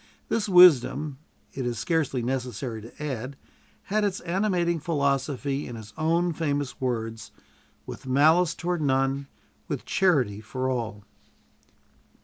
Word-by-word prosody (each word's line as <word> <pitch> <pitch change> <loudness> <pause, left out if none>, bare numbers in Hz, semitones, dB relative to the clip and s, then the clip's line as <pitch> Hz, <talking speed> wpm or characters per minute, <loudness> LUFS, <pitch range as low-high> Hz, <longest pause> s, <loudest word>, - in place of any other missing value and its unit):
This 215 -2 0
wisdom, 155 -5 +6 0.3
it 135 - -4
is 120 -1 -2
scarcely 135 0 0
necessary 125 -2 -3
to 115 +7 -10
add, 135 -1 -4 0.5
had 210 +1 0
its 200 -2 0
animating 175 -2 0
philosophy 140 -2 -1
in 120 - -7
his 110 -2 -10
own 170 +2 +1
famous 145 -5 -2
words, 115 -3 -3 0.5
"With - - -9
malice 160 +6 +4
toward 175 -1 -2
none, 135 0 +1 0.4
with - - -4
charity 130 - +2
for 130 +4 -3
all." 115 -5 -4
140 Hz, 125 wpm, -26 LUFS, 125-170 Hz, 0.5 s, wisdom